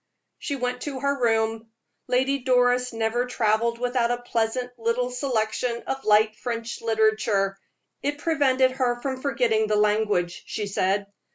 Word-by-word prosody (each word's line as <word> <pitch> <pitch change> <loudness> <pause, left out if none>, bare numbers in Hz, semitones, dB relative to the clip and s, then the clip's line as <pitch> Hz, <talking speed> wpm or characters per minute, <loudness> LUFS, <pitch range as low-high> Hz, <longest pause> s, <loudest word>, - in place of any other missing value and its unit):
She 285 - -3
went 250 -1 -3
to 275 -3 -4
her 280 -1 0
room. 225 -1 +1 0.4
Lady 260 +2 +1
Doris 250 -1 +2
never 230 +2 -1
traveled 230 -1 +1
without 245 -1 0
a 245 - 0
pleasant 245 +1 -2
little 235 +2 0
selection 240 -2 -1
of 270 0 -4
light 215 +1 +4
French 230 -1 -4
literature 215 -3 +1 0.5
"it 290 +1 -2
prevented 270 -5 +2
her 250 -2 0
from 260 -1 -3
forgetting 240 -6 +1
the 210 - +1
language," 210 -4 +1
she 210 - -3
said. 200 0 0
240 Hz, 145 wpm, -25 LUFS, 220-255 Hz, 0.5 s, light